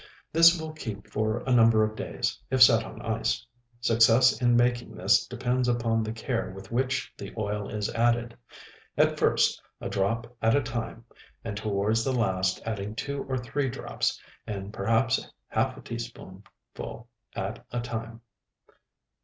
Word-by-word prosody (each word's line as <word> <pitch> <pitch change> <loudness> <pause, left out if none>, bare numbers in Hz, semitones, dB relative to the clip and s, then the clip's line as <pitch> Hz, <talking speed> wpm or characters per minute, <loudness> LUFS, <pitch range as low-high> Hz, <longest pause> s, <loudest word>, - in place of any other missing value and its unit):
This 165 +1 +7
will 160 0 -6
keep 110 -10 -6
for 110 +1 -1
a 130 - +2
number 115 -2 +6
of 110 0 -1
days, - - -3
if 130 -1 +6
set 115 -2 +6
on - - -9
ice. 110 0 -1 0.4
Success 115 +3 +5
in 120 -1 +4
making 120 0 +1
this - - +3
depends 125 0 -1
upon 115 -2 +1
the 110 0 -3
care 115 0 -2
with 95 +3 -11
which 130 +1 -1
the 100 - -7
oil 105 -1 -2
is 105 -1 -2
added; 120 0 +1 0.6
at - - +3
first, - - +3 0.2
a - - -4
drop 115 +5 -1
at 115 +2 +4
a 145 - +2
time, 115 -1 -5 0.4
and 105 -3 -3
towards 110 +1 0
the 135 - 0
last 95 -6 0
adding 105 -1 -4
two 140 +3 -3
or 130 - 0
three 130 +3 -2
drops, - - -2 0.3
and 100 -1 -5
perhaps 115 +3 +1 0.2
half - - 0
a - - -10
teaspoonful 115 0 -9 0.3
at - - -4
a 120 - -1
time. 115 -1 -5
115 Hz, 155 wpm, -27 LUFS, 110-120 Hz, 0.6 s, This